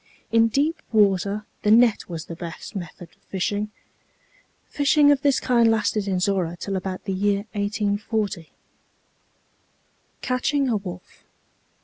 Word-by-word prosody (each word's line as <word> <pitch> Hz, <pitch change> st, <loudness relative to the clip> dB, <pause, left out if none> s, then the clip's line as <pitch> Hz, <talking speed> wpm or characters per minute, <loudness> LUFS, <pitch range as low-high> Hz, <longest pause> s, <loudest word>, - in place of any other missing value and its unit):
In 230 Hz, 0 st, +5 dB
deep 290 Hz, +8 st, 0 dB
water 205 Hz, -1 st, +2 dB, 0.2 s
the 210 Hz, -, 0 dB
net 230 Hz, -2 st, +4 dB
was 165 Hz, -3 st, -5 dB
the 170 Hz, -, -7 dB
best 170 Hz, +4 st, -8 dB
method 175 Hz, -2 st, -7 dB
of -, -, -31 dB
fishing. 205 Hz, +2 st, -2 dB, 1.0 s
Fishing 290 Hz, 0 st, +4 dB
of 280 Hz, -1 st, +2 dB
this 280 Hz, -2 st, +3 dB
kind 235 Hz, -2 st, +3 dB
lasted 215 Hz, -2 st, 0 dB
in 190 Hz, -2 st, 0 dB
Zorra 180 Hz, -3 st, 0 dB
till 195 Hz, +2 st, -4 dB
about 185 Hz, 0 st, -4 dB
the 195 Hz, -, -3 dB
year 200 Hz, +1 st, 0 dB
1840. 205 Hz, -3 st, -2 dB, 1.7 s
CATCHING 265 Hz, +2 st, 0 dB
A 225 Hz, -, +2 dB
WOLF. 185 Hz, -2 st, -10 dB
205 Hz, 130 wpm, -23 LUFS, 190-230 Hz, 1.7 s, In